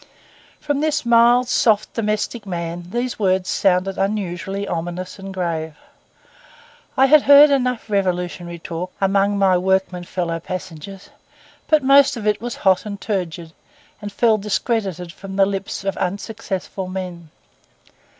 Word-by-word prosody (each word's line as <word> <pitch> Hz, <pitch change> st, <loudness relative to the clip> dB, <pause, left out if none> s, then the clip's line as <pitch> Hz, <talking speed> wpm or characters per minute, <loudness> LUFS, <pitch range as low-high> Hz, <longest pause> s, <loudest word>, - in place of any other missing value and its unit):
From 290 Hz, -2 st, -2 dB
this 305 Hz, -2 st, 0 dB
mild, 235 Hz, +1 st, +5 dB
soft, 215 Hz, -4 st, +2 dB
domestic 215 Hz, 0 st, -2 dB
man, 170 Hz, -1 st, -4 dB
these 240 Hz, +4 st, -3 dB
words 190 Hz, -2 st, +1 dB
sounded 190 Hz, 0 st, +1 dB
unusually 195 Hz, 0 st, -2 dB
ominous 180 Hz, +2 st, -5 dB
and 195 Hz, 0 st, -7 dB
grave. 165 Hz, -4 st, -3 dB, 1.2 s
I 265 Hz, -, +6 dB
had 300 Hz, +2 st, +6 dB
heard 285 Hz, +1 st, +8 dB
enough 250 Hz, -4 st, 0 dB
revolutionary 180 Hz, -3 st, -2 dB
talk 170 Hz, +2 st, -6 dB
among 195 Hz, +1 st, +2 dB
my 190 Hz, -2 st, +3 dB
workmen 190 Hz, -1 st, 0 dB
fellow 170 Hz, -2 st, -3 dB
passengers; 185 Hz, -, -8 dB, 0.6 s
but 310 Hz, -2 st, +3 dB
most 275 Hz, -1 st, +5 dB
of 215 Hz, -, -6 dB
it 210 Hz, 0 st, +1 dB
was 240 Hz, 0 st, -4 dB
hot 190 Hz, -1 st, +4 dB
and 200 Hz, -1 st, -6 dB
turgid, 175 Hz, -6 st, -4 dB, 0.5 s
and 205 Hz, 0 st, -6 dB
fell 220 Hz, +1 st, +2 dB
discredited 200 Hz, -4 st, -2 dB
from 195 Hz, -1 st, -9 dB
the 195 Hz, 0 st, +4 dB
lips 195 Hz, 0 st, -4 dB
of 195 Hz, 0 st, -2 dB
unsuccessful 195 Hz, 0 st, -4 dB
men. 180 Hz, -3 st, -6 dB
195 Hz, 135 wpm, -20 LUFS, 180-225 Hz, 1.2 s, heard